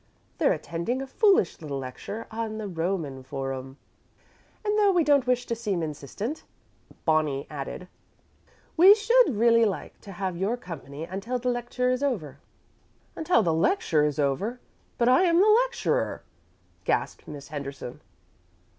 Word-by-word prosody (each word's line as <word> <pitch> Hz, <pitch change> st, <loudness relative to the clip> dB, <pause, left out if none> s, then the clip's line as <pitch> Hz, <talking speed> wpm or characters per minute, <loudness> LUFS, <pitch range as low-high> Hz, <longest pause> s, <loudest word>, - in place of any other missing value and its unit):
They're -, -, +4 dB
attending 170 Hz, +10 st, -2 dB
a 270 Hz, -, -4 dB
foolish 380 Hz, -, +2 dB
little 145 Hz, -3 st, -4 dB
lecture 135 Hz, -, -6 dB
on 220 Hz, -1 st, -4 dB
the 215 Hz, -1 st, -4 dB
Roman 165 Hz, -6 st, -3 dB
Forum." 135 Hz, 0 st, -5 dB, 0.9 s
"And 415 Hz, 0 st, +1 dB
though 415 Hz, -2 st, +4 dB
we 355 Hz, -3 st, +3 dB
don't 285 Hz, -3 st, +3 dB
wish 250 Hz, -1 st, +1 dB
to 235 Hz, -, -2 dB
seem 205 Hz, -7 st, -2 dB
insistent," 160 Hz, -, -5 dB, 0.6 s
Bonnie 155 Hz, -4 st, +1 dB
added, 150 Hz, +5 st, -6 dB, 0.9 s
"we 375 Hz, +5 st, +9 dB
should 465 Hz, -, +4 dB
really 230 Hz, +1 st, +5 dB
like 205 Hz, -4 st, -3 dB
to 200 Hz, -, -10 dB
have 185 Hz, -1 st, -3 dB
your 200 Hz, +7 st, -1 dB
company 150 Hz, -, -8 dB
until 195 Hz, +9 st, -3 dB
the 250 Hz, +1 st, -1 dB
lecture 245 Hz, +1 st, -1 dB
is 255 Hz, +1 st, -1 dB
over." 165 Hz, -, -2 dB, 0.8 s
"Until 320 Hz, -8 st, +2 dB
the 165 Hz, -3 st, +1 dB
lecture 165 Hz, -, +2 dB
is 150 Hz, -2 st, 0 dB
over! 155 Hz, -, -1 dB, 0.4 s
But 235 Hz, -, +2 dB
I 255 Hz, +6 st, +6 dB
am 340 Hz, -1 st, +3 dB
the 400 Hz, -, +5 dB, 0.2 s
lecturer," -, -, -1 dB, 0.6 s
gasped -, -, -1 dB
Miss 145 Hz, -2 st, -9 dB
Henderson. 140 Hz, -4 st, -7 dB
205 Hz, 145 wpm, -26 LUFS, 150-250 Hz, 0.9 s, we